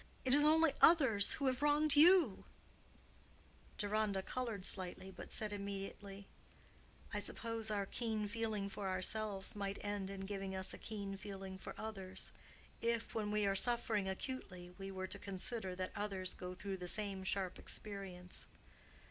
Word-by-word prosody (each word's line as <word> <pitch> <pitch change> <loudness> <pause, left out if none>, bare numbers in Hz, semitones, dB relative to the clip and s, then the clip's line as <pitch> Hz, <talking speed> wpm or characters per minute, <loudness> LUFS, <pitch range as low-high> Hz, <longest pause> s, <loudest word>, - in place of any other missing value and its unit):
"It 255 - +4
is 290 +1 +6
only 315 0 +6
others 265 -12 +7
who 280 - -2
have 260 0 +1
wronged 295 0 +4
you." 320 - +6 1.3
Deronda 205 -2 0
colored 230 -6 -3
slightly, 190 0 +1
but - - -9
said 215 -1 -1
immediately—"I 200 0 -8
suppose 230 -1 -3
our 205 -2 0
keen 220 0 -2
feeling 215 -2 -1
for 200 -1 -4
ourselves 195 +2 0
might 200 -1 -2
end 205 -2 -2
in 195 -1 -5
giving 195 -1 -4
us 190 0 -2
a - - -8
keen 200 -2 -4
feeling 195 -1 -7
for - - -7
others, 195 -4 -5 0.5
if, 230 0 0
when 215 -2 -1
we 210 0 +2
are 195 - +3
suffering 215 -2 +3
acutely, 190 -5 -5
we 195 0 -5
were 190 -1 -4
to - - -6
consider 190 0 -2
that 185 0 -3
others 195 -3 -1
go 180 0 -6
through 195 +1 -4
the 180 -1 -5
same 200 -1 +1
sharp 190 -1 -1
experience. 190 -3 -5
200 Hz, 150 wpm, -38 LUFS, 190-225 Hz, 1.3 s, others